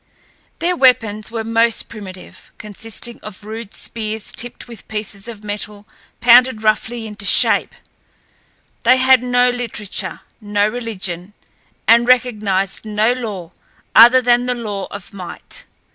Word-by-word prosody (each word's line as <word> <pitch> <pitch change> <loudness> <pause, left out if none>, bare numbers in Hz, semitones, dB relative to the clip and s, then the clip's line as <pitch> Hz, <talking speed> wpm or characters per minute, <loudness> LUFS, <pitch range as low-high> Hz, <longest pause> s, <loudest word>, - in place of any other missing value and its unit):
Their 355 +2 0
weapons 225 -7 +2
were 225 0 -4
most 230 +1 +1
primitive, 190 -4 -11
consisting 225 +3 -7
of 210 -1 -10
rude 220 0 -8
spears 220 -1 -4
tipped 245 +1 -7
with 235 -4 -11
pieces 210 -1 -5
of 220 -3 -9
metal 205 0 -6 0.3
pounded 245 -1 +6
roughly 225 +2 0
into 210 -2 -7
shape. - - +3 1.1
They 255 +2 +5
had 260 -1 +5
no 250 0 +2
literature, 230 -5 -3 0.2
no 205 0 +1
religion, 205 -5 -5 0.5
and 235 +1 +5
recognized 210 -7 +1
no 215 +2 +1
law 205 -9 -6 0.4
other 245 +3 +8
than 245 0 +3
the 250 - 0
law 210 -5 -4
of 200 -1 -9
might. 180 -3 -8
220 Hz, 130 wpm, -18 LUFS, 205-240 Hz, 1.1 s, other